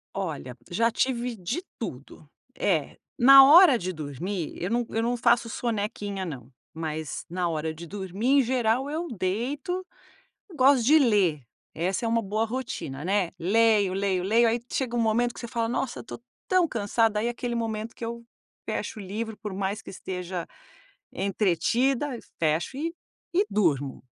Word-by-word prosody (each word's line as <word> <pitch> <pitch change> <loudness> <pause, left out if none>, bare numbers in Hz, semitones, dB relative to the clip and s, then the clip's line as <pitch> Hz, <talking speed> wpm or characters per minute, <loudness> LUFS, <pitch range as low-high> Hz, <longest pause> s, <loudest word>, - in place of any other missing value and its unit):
Olha, 140 -9 -4
já 230 +6 +2
tive 245 -1 -1
de 215 - -3 0.2
tudo. 145 - -8 0.3
É, 165 - 0 0.2
na 270 +2 +10
hora 300 0 +8
de 185 -2 -4
dormir, 160 +4 -4
eu 180 - -1
não 240 +1 0
eu 225 - -1
não 240 +1 0
faço 235 0 +3
sonequinha 205 -4 -3
não. 135 -7 -8 0.2
Mas 160 -1 -4
na 175 +1 -1
hora 160 0 -2
de 165 +2 -9
dormir 195 +4 -4
em - - +6
geral 250 +1 +1
eu 325 +4 -3
deito, 260 - -2 0.7
gosto 265 -3 +4
de 305 +6 +6
ler. 200 - +2 0.3
Essa 185 +7 -1
é - - +1
uma 230 0 +1
boa 215 +2 -1
rotina, 225 - -5
né? 190 -1 +1
Leio, 205 +2 +3
leio, 190 -2 0
leio 225 +5 +4
aí 235 +1 0
chega 245 -3 -1
um - - +2
momento 230 +2 +1
que - - -9
você 235 - -6
fala: 230 -1 -1
"Nossa 245 +1 -2
estou 230 - -9 0.3
tão 365 -3 +3
cansada," 220 -1 +1
aí 215 - 0
é - - +1
aquele 240 0 -4
momento 225 -1 -3
que - - -7
eu 235 0 -6 0.4
fecho - - -3
o - - -6
livro 215 +3 -5
por 210 -1 -6
mais 195 +2 -3
que - - -10
esteja 180 -2 -5 0.7
entretida, 215 - +1 0.3
fecho 165 +10 0
e 330 +3 -2 0.4
e 385 +4 +3
durmo. 145 -9 0
220 Hz, 165 wpm, -26 LUFS, 180-240 Hz, 0.7 s, na